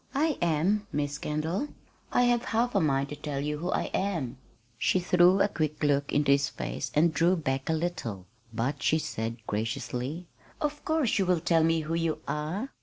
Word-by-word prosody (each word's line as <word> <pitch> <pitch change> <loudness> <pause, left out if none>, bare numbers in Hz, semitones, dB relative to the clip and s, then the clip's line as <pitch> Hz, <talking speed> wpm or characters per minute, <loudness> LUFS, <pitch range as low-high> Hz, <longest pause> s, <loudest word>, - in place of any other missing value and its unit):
"I 305 +1 +1
am 175 +6 +1
Miss 145 0 -2
Kendall, 160 - -2 0.4
I 245 - +4
have 240 -1 +2
half 240 +2 +1
a - - +3
mind 140 -3 +1
to 150 - -5
tell 145 -1 -4
you 150 +1 -2
who 175 +3 -3
I - - -1
am." 165 -11 -1 0.4
She 185 - +3
threw 180 +1 +5
a - - +5
quick 155 -6 -2
look 145 -1 +2
into 145 -1 +3
his 140 0 +3
face - - -4
and 160 +2 +4
drew 170 +5 +3
back 135 -4 -2
a - - +3
little; 155 - -3 0.3
but 115 +5 -2
she 155 - +3
said 115 -6 -4
graciously: 125 +9 -3 0.3
"Of 295 0 -2
course 315 -9 +1
you 190 - +1
will 180 -2 +3
tell 165 0 +3
me 165 0 +3
who 155 +1 -4
you 165 -1 0
are." 175 - -3
160 Hz, 190 wpm, -28 LUFS, 140-185 Hz, 0.4 s, threw